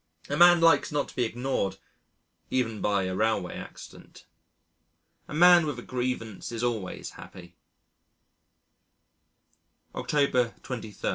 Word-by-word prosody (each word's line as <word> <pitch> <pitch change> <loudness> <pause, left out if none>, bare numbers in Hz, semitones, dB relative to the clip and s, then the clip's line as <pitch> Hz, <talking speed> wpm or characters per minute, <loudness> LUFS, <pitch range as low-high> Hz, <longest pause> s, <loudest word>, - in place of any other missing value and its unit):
A 145 - -1
man 175 +1 +7
likes 165 -3 +4
not 145 -1 -1
to - - -14
be 125 - +1
ignored 120 -3 -2 0.7
even 115 -4 -1
by 100 -2 +1
a 95 0 -3
railway 110 -3 0
accident. - - -12 1.0
A - - -9
man 175 0 +6
with 145 -4 -3
a 120 - -8
grievance 125 -5 -4
is 115 0 -4
always 110 -6 -3
happy. 85 -1 -13 2.4
October 130 -5 0
23. 110 -5 -7
120 Hz, 120 wpm, -27 LUFS, 110-145 Hz, 2.4 s, man